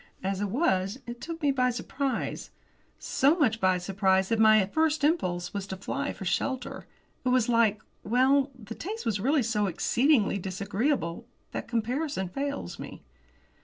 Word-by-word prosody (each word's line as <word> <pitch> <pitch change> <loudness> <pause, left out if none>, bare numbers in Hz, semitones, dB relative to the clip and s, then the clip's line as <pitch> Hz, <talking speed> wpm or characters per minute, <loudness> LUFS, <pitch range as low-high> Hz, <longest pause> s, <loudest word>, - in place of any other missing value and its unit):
As 195 +1 -1
it 205 - -1
was, 195 - +1
it 240 0 -8
took 330 -1 -6
me 285 - +4
by 255 -2 +2
surprise, 260 +1 -3 0.5
so 285 +6 +2
much 225 -9 +2
by 185 -1 +3
surprise 190 +1 +1
that 225 - +1
my 215 -2 +6
first 315 +7 +1
impulse 180 - 0
was 200 -1 -4
to 190 - -5
fly 280 +9 -3
for 195 - -8
shelter. 250 +7 -2 0.4
It 255 - +1
was 250 -2 +3
like 225 -3 +2 0.2
well, 260 +5 +3
the 220 -2 -8
taste 425 - -6
was 210 -3 0
really 270 +6 +2
so 210 -2 0
exceedingly 225 - +2
disagreeable 195 - -2 0.2
that - - -5
comparison 235 - -2
fails 280 +7 -4
me. - - -9
230 Hz, 160 wpm, -28 LUFS, 195-275 Hz, 0.5 s, my